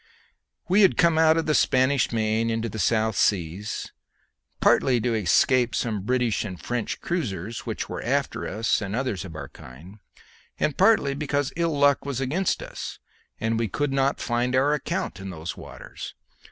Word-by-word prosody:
We 190 +4 +4
had 195 - +5
come 170 -2 +4
out 160 0 +5
of 165 - 0
the 155 - +1
Spanish 130 -1 +3
Main 110 0 0
into 115 0 -1
the 110 - -6
South 110 +2 +1
Seas, 95 +2 -1 0.7
partly 125 -2 +4
to 120 +1 0
escape 115 +4 +3
some 110 -4 -1
British 125 +1 0
and 95 -5 -6
French 120 -2 -3
cruisers 110 - -3
which - - -3
were - - -5
after - - -1
us 110 +3 0
and 100 0 -3
others 115 -7 -2
of 80 -4 -9
our 70 -3 -7
kind, 80 +12 -13 0.6
and 150 - 0
partly 195 -8 +4
because 145 -1 -1
ill 165 -3 0
luck 140 -1 +4
was 140 -3 -3
against 155 +8 0
us, - - -7 0.4
and 115 0 0
we 115 - 0
could 140 +7 -2
not 135 +1 +1
find 120 +1 0
our 140 +3 +3
account 130 -8 -3
in 95 0 -6
those 85 -1 -6
waters. - - -9
120 Hz, 170 wpm, -25 LUFS, 105-140 Hz, 0.7 s, had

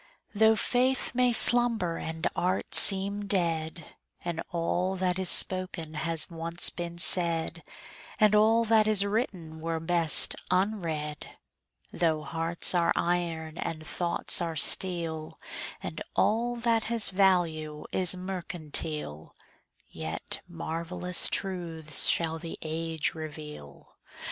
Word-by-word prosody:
Though 220 +1 +4
faith 255 +4 0
may 250 0 +2
slumber 230 -7 +4
and 160 0 -5
art 185 +2 -2
seem 200 +1 +6
dead, 165 -4 -2 0.3
And 170 -1 -3
all 175 +2 -2
that 185 0 -1
is 185 -2 +1
spoken 185 -4 +2
has 160 0 -1
once 170 0 +1
been 170 -1 -6
said, 170 -2 +1 0.6
And 215 -1 +4
all 220 +2 +3
that 220 -1 +3
is 205 -2 +2
written 185 -7 -4
were 165 0 -3
best 165 -1 +5
unread; 170 -6 -3 0.6
Though 160 -3 0
hearts 165 +3 0
are 170 -1 +2
iron 170 -2 -2
and 155 -1 -5
thoughts 175 +3 0
are 165 -1 -3
steel, 165 -1 0 0.5
And - - -6
all 235 +3 +1
that 230 -1 0
has 230 -1 0
value 170 -6 0
is 185 -1 +1
mercantile, 155 - -4 0.5
Yet 80 0 -5
marvellous 170 - -1
truths 165 -6 -2
shall 165 -1 +1
the 165 0 -8
age 160 0 -3
reveal. 150 - -10
170 Hz, 115 wpm, -27 LUFS, 160-195 Hz, 0.6 s, seem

